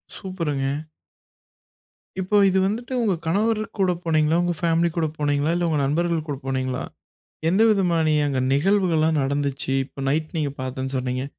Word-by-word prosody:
சூப்பருங்க! 165 Hz, -8 st, -3 dB, 1.6 s
இப்ப, 190 Hz, +3 st, +2 dB
இது 190 Hz, 0 st, +2 dB
வந்துட்டு 235 Hz, +6 st, -3 dB
உங்க 215 Hz, -5 st, +2 dB
கணவரு 215 Hz, +5 st, +1 dB, 0.2 s
கூட 185 Hz, -2 st, +3 dB
போனீங்களா? 155 Hz, -1 st, +2 dB
உங்க 175 Hz, 0 st, 0 dB
ஃபேமிலி 170 Hz, 0 st, +2 dB
கூட 160 Hz, -2 st, +1 dB
போனீங்களா? 145 Hz, +1 st, +1 dB
இல்ல 175 Hz, -, 0 dB
உங்க 155 Hz, -2 st, +1 dB
நண்பர்கள் 165 Hz, +2 st, 0 dB
கூட 140 Hz, -, -3 dB
போனீங்களா? 130 Hz, -1 st, -2 dB, 0.7 s
எந்த 190 Hz, +5 st, +2 dB
விதமான 170 Hz, -6 st, +2 dB
அங்க 135 Hz, -2 st, -1 dB
நிகழ்வுகள்லாம் 160 Hz, -2 st, +2 dB
நடந்துச்சு? 140 Hz, -1 st, -1 dB
இப்ப 135 Hz, 0 st, -8 dB
நைட் 155 Hz, +2 st, 0 dB
நீங்க 145 Hz, -2 st, -1 dB
பார்த்தேன்னு 130 Hz, +1 st, -4 dB
சொன்னீங்க? 130 Hz, +1 st, -2 dB
160 Hz, 140 wpm, -23 LUFS, 140-180 Hz, 1.6 s, கூட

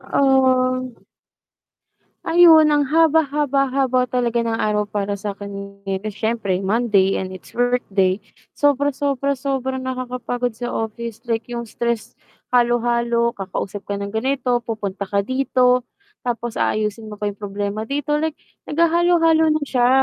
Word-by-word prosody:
Ah. 260 Hz, -2 st, +2 dB, 1.4 s
Ayun 325 Hz, -3 st, +7 dB
ang 290 Hz, -2 st, +2 dB
haba, 320 Hz, +1 st, +4 dB
haba, 280 Hz, -1 st, +1 dB
haba, 255 Hz, -1 st, +1 dB
talaga 240 Hz, -1 st, 0 dB
ng 230 Hz, -1 st, -1 dB
araw 210 Hz, -1 st, 0 dB
para 200 Hz, -1 st, -2 dB
sa 200 Hz, -1 st, -4 dB
akin, 200 Hz, 0 st, -8 dB, 0.3 s
siyempre 215 Hz, -2 st, -1 dB
Monday 200 Hz, -2 st, +2 dB
and 190 Hz, -, -4 dB
it's 185 Hz, -, -13 dB
workday, 205 Hz, -6 st, +1 dB, 0.4 s
sobra, 285 Hz, -1 st, +2 dB
sobra, 280 Hz, 0 st, -1 dB
sobrang 265 Hz, -1 st, -2 dB
nakakapagod 250 Hz, -2 st, -3 dB
sa 240 Hz, +1 st, -4 dB
office 225 Hz, 0 st, -4 dB
like 225 Hz, -1 st, 0 dB
yung 235 Hz, -1 st, -5 dB
stress 235 Hz, -2 st, -3 dB, 0.4 s
halo-halo, 235 Hz, -1 st, +2 dB
kakausap 195 Hz, +1 st, -5 dB
ka 200 Hz, 0 st, -4 dB
ng 200 Hz, -, -3 dB
ganito, 250 Hz, 0 st, 0 dB
pupunta 205 Hz, -3 st, -4 dB
ka 200 Hz, +1 st, 0 dB
dito, 250 Hz, +1 st, +2 dB, 0.4 s
tapos 240 Hz, -1 st, -3 dB
aayusin 215 Hz, +1 st, -1 dB
mo 210 Hz, -, -10 dB
pa 210 Hz, -, 0 dB
yung 200 Hz, -, -7 dB
problema 205 Hz, +1 st, -4 dB
dito. 290 Hz, +4 st, -1 dB
Like 310 Hz, 0 st, -2 dB, 0.3 s
naghahalo-halo 330 Hz, 0 st, +3 dB
na 310 Hz, 0 st, -1 dB
siya, 245 Hz, -3 st, +2 dB
240 Hz, 135 wpm, -21 LUFS, 210-270 Hz, 1.4 s, Ayun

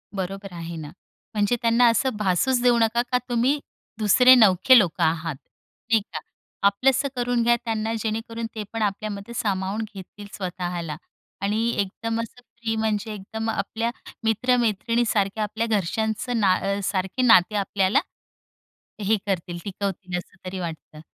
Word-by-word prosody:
बरोबर 195 Hz, 0 st, -5 dB
आहे 170 Hz, 0 st, -6 dB
ना, 155 Hz, -2 st, -7 dB, 0.5 s
म्हणजे 210 Hz, +3 st, +2 dB
त्यांना 235 Hz, +1 st, +4 dB
असं 230 Hz, +2 st, +1 dB
भासूच 210 Hz, +6 st, +1 dB
देऊ 245 Hz, -1 st, +4 dB
नका, 225 Hz, +1 st, +2 dB
का 250 Hz, -, +4 dB
तुम्ही 245 Hz, +5 st, +2 dB, 0.4 s
दुसरे 250 Hz, +5 st, +7 dB
नवखे 225 Hz, +3 st, +6 dB
लोकं 185 Hz, -7 st, 0 dB
आहात, 160 Hz, -1 st, 0 dB, 0.5 s
नाही 225 Hz, -1 st, +4 dB
का? -, -, -2 dB, 0.5 s
आपलंसं 265 Hz, +7 st, +2 dB
करून 245 Hz, -1 st, 0 dB
घ्या 240 Hz, +1 st, +4 dB
त्यांना, 225 Hz, -1 st, -1 dB
जेणेकरून 225 Hz, +1 st, -3 dB
ते 215 Hz, -, -3 dB
पण 225 Hz, -, -3 dB
आपल्यामध्ये 205 Hz, +1 st, -3 dB
सामावून 200 Hz, -1 st, -1 dB
घेतील 200 Hz, +1 st, -10 dB
स्वतःला. 175 Hz, -4 st, -4 dB, 0.5 s
आणि 215 Hz, +4 st, 0 dB
एकदम 225 Hz, +3 st, -2 dB
असं 230 Hz, +2 st, -9 dB
फ्री, 230 Hz, -1 st, -5 dB
म्हणजे 220 Hz, 0 st, -1 dB
एकदम 220 Hz, +3 st, -5 dB
आपल्या 225 Hz, +2 st, -2 dB, 0.3 s
मित्रमैत्रिणीसारख्या, 225 Hz, -2 st, +1 dB
आपल्या 220 Hz, +2 st, -2 dB
घरच्यांच 220 Hz, +2 st, -1 dB
ना 200 Hz, -1 st, +2 dB
सारखं 190 Hz, +6 st, -1 dB
नाते 210 Hz, -2 st, +6 dB
आपल्याला 195 Hz, -1 st, +2 dB, 1.0 s
हे 210 Hz, +2 st, +2 dB
करतील, 175 Hz, -3 st, -2 dB
टिकवतील, 195 Hz, -2 st, -4 dB
असं 180 Hz, -, -11 dB
तरी 185 Hz, +1 st, -4 dB
वाटतं. 160 Hz, -3 st, -7 dB
215 Hz, 135 wpm, -24 LUFS, 190-230 Hz, 1.0 s, दुसरे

